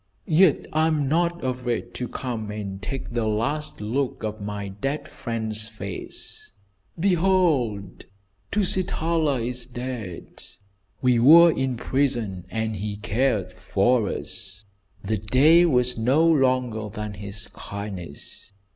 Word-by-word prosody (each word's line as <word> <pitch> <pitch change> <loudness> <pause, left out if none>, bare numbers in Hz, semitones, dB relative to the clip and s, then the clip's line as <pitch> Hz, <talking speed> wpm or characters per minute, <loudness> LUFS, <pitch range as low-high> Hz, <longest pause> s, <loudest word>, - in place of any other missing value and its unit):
Yet 165 0 +4
I 155 +1 +3
am 150 -3 +1
not 170 +3 +1
afraid 125 -2 -2
to 125 - -4
come 115 -5 -4
and 100 -2 -5
take 135 +7 -5
the 120 -2 -1
last 120 +7 -2
look 125 +4 -2
of 110 0 -4
my 100 -1 -4
dead 135 +10 -3
friend's 110 -2 -2
face. 100 -4 -8 0.5
Behold, 165 - +1 0.5
Tusitala 170 - +1
is 125 -1 -5
dead. 120 -7 -6 0.6
We 125 -2 +4
were 165 +7 +8
in 130 -4 -1
prison 115 -9 -1
and 110 -1 -2
he 105 +1 -3
cared 110 0 0
for 110 +2 +1
us. 95 +2 -6 0.4
The 110 +2 0
day 150 - +5
was 125 -4 +1
no 135 +8 +3
longer 130 -7 +2
than 105 0 -5
his 100 +1 -4
kindness. 100 -4 -8
120 Hz, 120 wpm, -24 LUFS, 105-140 Hz, 0.6 s, were